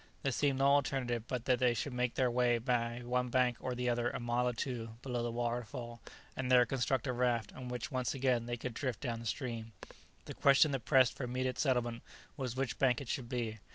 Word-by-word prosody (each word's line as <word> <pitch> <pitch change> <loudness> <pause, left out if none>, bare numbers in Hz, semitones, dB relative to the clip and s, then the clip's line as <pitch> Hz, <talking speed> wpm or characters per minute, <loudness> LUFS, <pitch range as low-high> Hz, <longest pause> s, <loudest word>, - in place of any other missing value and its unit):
There 135 - +1
seemed 140 +1 +1
no 135 - +2
alternative 135 -4 +2
but 125 -2 -3
that 125 -2 +3
they 125 -2 +3
should 130 +4 -3
make 125 -1 -1
their 130 -2 +2
way 120 -1 +3
by 120 0 -1
one 125 +1 0
bank 125 -1 +2
or 125 -1 -3
the 125 0 -2
other 120 0 +1
a - - -4
mile 120 +1 0
or 125 - 0
two 115 -2 -4
below 125 -3 -2
the 120 - -1
waterfall, 120 0 -4 0.3
and 130 -1 -2
there 125 -1 +7
construct 130 0 0
a 130 - -1
raft 120 -3 0
on 130 -1 -8
which 125 +5 -4
once 130 -1 -1
again 125 -3 +1
they 120 0 -2
could 125 +1 -5
drift 125 -2 -3
down 120 -4 -2
the 115 - -6
stream. 115 -1 -4 0.5
The - - -6
question 140 +2 +5
that 135 -5 -3
pressed 130 -4 +5
for - - -5
immediate 130 +1 -2
settlement 120 -4 +1 0.3
was 130 -4 -4
which 130 -2 -2
bank 125 -3 +3
it 140 -4 -8
should 120 -3 -3
be. 115 -4 -3
125 Hz, 225 wpm, -34 LUFS, 120-130 Hz, 0.5 s, there